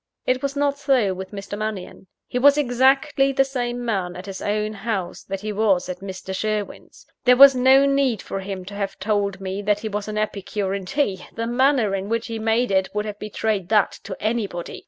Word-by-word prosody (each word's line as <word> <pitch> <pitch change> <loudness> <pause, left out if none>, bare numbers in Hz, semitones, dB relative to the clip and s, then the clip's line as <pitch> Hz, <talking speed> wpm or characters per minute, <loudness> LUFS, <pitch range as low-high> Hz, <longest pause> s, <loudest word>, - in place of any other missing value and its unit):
It 255 0 +1
was 275 0 -2
not 285 0 0
so 260 -9 +2
with 190 +1 -7
Mr. 200 0 -6
Mannion. 210 -3 -5 0.2
He 250 - -3
was 285 +2 +6
exactly 270 +1 +3
the 270 0 +3
same 245 -2 -3
man 190 -6 -2
at 180 +1 -8
his 195 -1 -7
own 210 +1 -1
house 195 -4 -4
that 195 0 -5
he 215 0 -4
was 200 -4 +2
at 180 0 -5
Mr. 190 0 -6
Sherwin's. 215 0 -4 0.2
There 250 -1 +5
was 275 +1 +10
no 260 +2 +5
need 275 -5 +2
for 195 - -5
him 190 -1 -6
to 200 - -9
have 200 -1 -4
told 200 -1 -1
me 195 +1 -4
that 210 0 0
he 220 - -3
was 210 0 -4
an 215 0 -4
epicure 205 -2 -2
in 195 -1 -4
tea; 200 -7 -1
the 230 - -2
manner 245 -3 +2
in 195 +1 -3
which 230 0 -1
he 225 -1 -5
made 225 +1 +1
it 190 0 +2
would 210 0 -1
have 210 -1 -6
betrayed 210 -3 -2
that 210 -2 +3
to 190 -2 -6
anybody. 210 -6 -3
215 Hz, 215 wpm, -22 LUFS, 195-250 Hz, 0.2 s, was